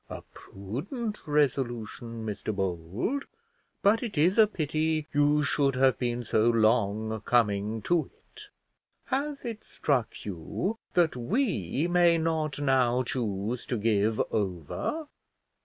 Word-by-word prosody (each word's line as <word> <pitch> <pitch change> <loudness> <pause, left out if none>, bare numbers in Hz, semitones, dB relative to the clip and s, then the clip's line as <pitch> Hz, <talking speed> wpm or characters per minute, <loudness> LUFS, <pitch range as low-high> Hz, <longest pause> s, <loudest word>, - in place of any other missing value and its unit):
A - - -7
prudent 180 - -5
resolution, 120 -5 -1
Mr 105 0 -3
Bold; 95 - -2 0.6
but 210 +3 +4
it 230 -9 -5
is 180 +8 +3
a 215 - +8
pity 155 -3 -1
you 145 +1 +3
should 140 -1 +1
have 130 0 +3
been 120 -1 -1
so 110 0 +2
long 110 -1 +2
coming 110 -2 +1
to 175 -2 +1 0.2
it. - - -12 0.6
Has 280 0 -2
it 225 -2 -5
struck 130 -6 -1
you 105 - -3 0.2
that 170 -5 +3
we 150 - 0
may 175 -1 +4
not 160 -2 -1
now 130 -3 +2
choose 115 -1 -2
to 125 - -1
give 110 0 +1
over? 100 - -2
130 Hz, 125 wpm, -28 LUFS, 110-165 Hz, 0.6 s, a